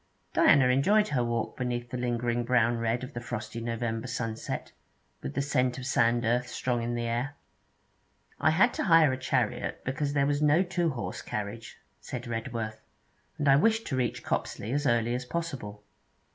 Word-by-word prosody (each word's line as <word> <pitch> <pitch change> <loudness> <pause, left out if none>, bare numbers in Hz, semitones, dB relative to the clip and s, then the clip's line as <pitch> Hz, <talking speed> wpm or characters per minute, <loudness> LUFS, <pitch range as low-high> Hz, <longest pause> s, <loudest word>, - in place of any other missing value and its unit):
Diana 135 -3 +5
enjoyed 200 +12 +3
her 125 -4 +1
walk 120 -1 -2
beneath 120 -1 -3
the 125 - -3
lingering 120 -1 0
brown 120 -1 +2
red 115 +2 0
of 130 +3 -7
the 120 - -5
frosty 115 -1 -5
November 115 0 -2
sunset, 115 -2 -4 0.5
with 65 - -6
the 140 - +1
scent 130 -3 +1
of 125 - -6
sand 120 -2 +2
earth 120 +2 +1
strong 125 -1 -1
in 120 +1 -2
the 120 - -2
air. 120 +5 -2 1.0
'I - - +4
had 190 +10 +4
to - - -2
hire 165 -6 +6
a - - -2
chariot 125 -2 -1
because 140 +2 -1
there 140 -1 +3
was 145 +1 0
no 150 +4 +4
two 175 -2 0
horse 130 -5 -4
carriage,' 105 +2 -5 0.2
said - - -6
Redworth, 115 -2 -4 0.6
'and 145 - -1
I 135 0 +7
wished 225 +7 +3
to 135 - -2
reach 125 -2 -1
Copsley 110 - -2
as 145 0 +1
early 120 -1 +2
as 125 +1 -2
possible.' 125 -11 -5
125 Hz, 180 wpm, -29 LUFS, 115-140 Hz, 1.0 s, I